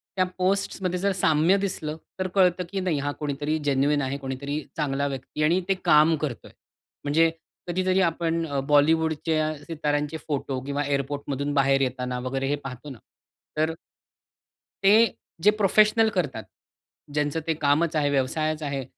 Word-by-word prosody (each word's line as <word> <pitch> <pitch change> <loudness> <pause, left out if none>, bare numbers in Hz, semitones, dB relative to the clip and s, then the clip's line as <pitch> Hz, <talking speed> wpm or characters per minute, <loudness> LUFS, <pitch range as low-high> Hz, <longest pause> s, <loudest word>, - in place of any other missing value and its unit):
त्या 185 -1 +2
पोस्ट्समध्ये 185 -1 0
जर 200 +1 +1
साम्य 170 0 +3
दिसलं 180 -6 -3 0.2
तर 185 - 0
कळतं, 180 -2 +3
की 195 - -3
नाही 180 -6 0
हा 145 +1 -1
कोणीतरी 150 +1 -2 0.4
आहे 135 +1 -2
कोणीतरी 140 +2 -4 0.2
चांगला 140 -2 0
व्यक्ती 135 +2 -4
आणि 170 +5 +3
ते 195 - +5
काम 155 +2 +6
करतोय. 145 -6 -5 0.5
म्हणजे 160 +3 +3 0.4
कधीतरी 185 +2 +1
आपण 165 -1 0
अ, 140 -2 -2
बॉलिवूडचे 160 +2 +2 0.3
सिताऱ्यांचे 150 -2 -2
फोटो 140 -3 -2
किंवा 140 +1 -1
एअरपोर्ट 140 0 -2
मधून 140 +1 -2
बाहेर 135 -1 +3
येताना 125 -1 -2
वगैरे 135 +2 -2
हे 145 - +1
पाहतो 130 +2 -7
ना. 130 - -9 0.6
तर 160 +1 +1 1.1
ते, 215 +4 +5 0.3
जे 210 - +7
प्रोफेशनल 215 +2 +4
करतात, 150 - -2 0.7
ज्यांचं 150 +1 0
ते 165 - +2
कामच 155 +2 +1
आहे 145 -2 +2
व्यवसायच 155 +3 0
आहे; 140 -2 -3
150 Hz, 145 wpm, -25 LUFS, 140-175 Hz, 1.1 s, जे